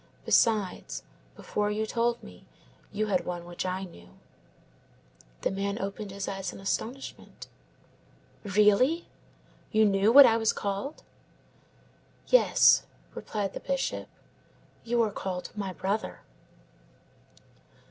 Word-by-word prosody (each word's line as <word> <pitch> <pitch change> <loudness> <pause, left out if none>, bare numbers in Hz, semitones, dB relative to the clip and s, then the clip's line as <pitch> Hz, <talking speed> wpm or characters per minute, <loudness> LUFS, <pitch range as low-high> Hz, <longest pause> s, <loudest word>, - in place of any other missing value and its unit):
Besides, 215 -5 +1 0.3
before 210 0 -2
you 215 +1 -1
told 235 +1 -1
me - - -14 0.4
you 215 +1 -1
had 195 -4 0
one 175 -1 -5
which 175 +1 -4
I 185 +1 -2
knew." 90 - -12 1.3
The - - 0
man 200 +1 -2
opened 200 +1 -5
his 195 0 -5
eyes 195 -1 -4
in - - -11
astonishment. 230 +7 -5 1.0
"Really? 210 - +3 0.6
You 220 -1 +4
knew 200 +1 +3
what 280 +2 +10
I 225 - +4
was 225 -1 +2
called?" 200 +9 -4 1.2
"Yes," - - +5 0.3
replied 200 -3 -4
the - - -5
Bishop, 275 -1 -2 0.8
"you 235 0 +2
are 215 - -1
called 185 -2 -5
my 200 -2 -3
brother." 195 +6 -3
205 Hz, 115 wpm, -28 LUFS, 195-225 Hz, 1.3 s, what